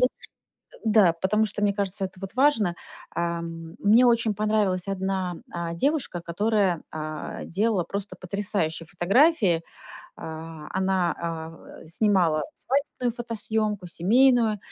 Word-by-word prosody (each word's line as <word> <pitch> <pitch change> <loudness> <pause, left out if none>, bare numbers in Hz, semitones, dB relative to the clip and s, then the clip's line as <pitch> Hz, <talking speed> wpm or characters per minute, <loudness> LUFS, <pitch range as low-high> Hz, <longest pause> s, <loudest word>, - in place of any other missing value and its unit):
ш 250 - +6 0.7
э, - - -25
да, 210 -6 +5
потому 200 +6 +1
что 210 -1 -4
мне 205 -1 +3
кажется, 200 0 -2
это 185 0 -10
вот 195 0 -7
важно. 240 -10 +3 0.4
Ам, 170 0 -4
мне 220 +5 +5
очень 235 -2 +3
понравилась 210 -3 +1
одна, 190 -2 -2 0.2
а, 170 -1 -3
девушка, 270 - 0
которая, 190 0 +1
а, 155 -1 -5
делала 200 +1 +1
просто 200 +3 -6
потрясающие 185 -4 -2
фотографии. 195 - +3 0.5
А, 160 -1 -8
она, 190 -2 +1
а, 165 -1 -4
в 165 - -15 0.2
э, - - -15
снимала 170 -3 +2
свадебную 270 -2 -1
фотосъёмку, 220 -4 -2
семейную. 225 +5 +3
195 Hz, 130 wpm, -25 LUFS, 170-220 Hz, 0.7 s, ш